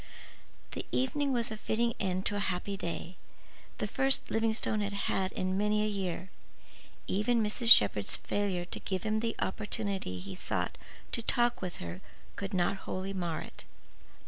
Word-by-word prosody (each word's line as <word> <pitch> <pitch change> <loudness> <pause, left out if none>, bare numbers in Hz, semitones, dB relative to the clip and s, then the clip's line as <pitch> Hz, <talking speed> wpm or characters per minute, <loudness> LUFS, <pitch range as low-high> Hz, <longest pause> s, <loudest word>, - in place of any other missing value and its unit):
The - - -4
evening 275 +2 +1
was 235 -3 +1
a 220 - -3
fitting 235 +2 +1
ending 185 -2 0
to 205 - -1
a 200 - 0
happy 185 +2 -2
day—the 175 -1 -7
first 270 0 +2
Livingstone 220 -1 +1
had 205 0 -1
had 195 -1 0
in 185 +1 0
many 210 +1 +2
a - - +1
year. 190 -3 -3 0.7
Even 220 +4 +2
Mrs. 230 +3 +1
Shepherd's 105 - +7
failure 195 -4 -1
to - - -6
give 190 -2 -2
him 215 0 +1
the 230 0 -1
opportunity 200 - -2
he 95 +2 -6
sought - - -2 0.3
to - - -1
talk 240 +1 +2
with 180 -2 -3
her 85 +1 -6 0.3
could 195 -1 -4
not 180 +2 +2
wholly 190 +1 -2
mar 175 -4 -2
it. - - -10
200 Hz, 160 wpm, -32 LUFS, 185-220 Hz, 0.7 s, Shepherd's